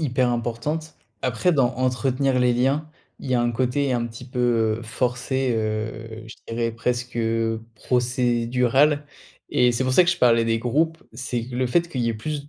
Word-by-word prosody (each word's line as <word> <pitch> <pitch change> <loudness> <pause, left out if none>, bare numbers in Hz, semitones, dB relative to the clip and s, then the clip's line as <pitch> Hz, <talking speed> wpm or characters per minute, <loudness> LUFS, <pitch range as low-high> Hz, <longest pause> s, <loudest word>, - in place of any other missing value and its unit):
hyper 130 -4 +1
importante. 145 +7 -3 0.3
Après, 130 +8 +1
dans 130 -5 +2
entretenir 130 +1 +1
les 125 -1 +3
liens, 135 +5 +1 0.3
il 130 - -6
y 125 - +3
a 120 - +3
un 120 0 +1
côté 130 +3 0
un 120 -1 0
petit 115 +2 -10
peu 120 -4 +1
heu - - -10
forcé, 125 +3 -1
heu, 110 +1 -4
je 110 - -10
dirais 115 0 -1
presque, 120 +1 -2
heu, 115 -1 0
procédural. 125 +4 +2 0.4
Et 125 0 +4
c'est 120 +2 0
pour 130 - 0
ça 180 - +7
que 175 - +2
je 175 - -2
parlais 115 -2 +4
des 115 0 +1
groupes, 160 +8 0
c'est 120 0 -3
que 125 - -8
le 130 +1 +1
fait 170 +6 +2
qu'il 135 -7 -3
y 115 - +1
ait 115 - -1
plus 145 +6 -5
125 Hz, 190 wpm, -23 LUFS, 115-130 Hz, 0.4 s, ça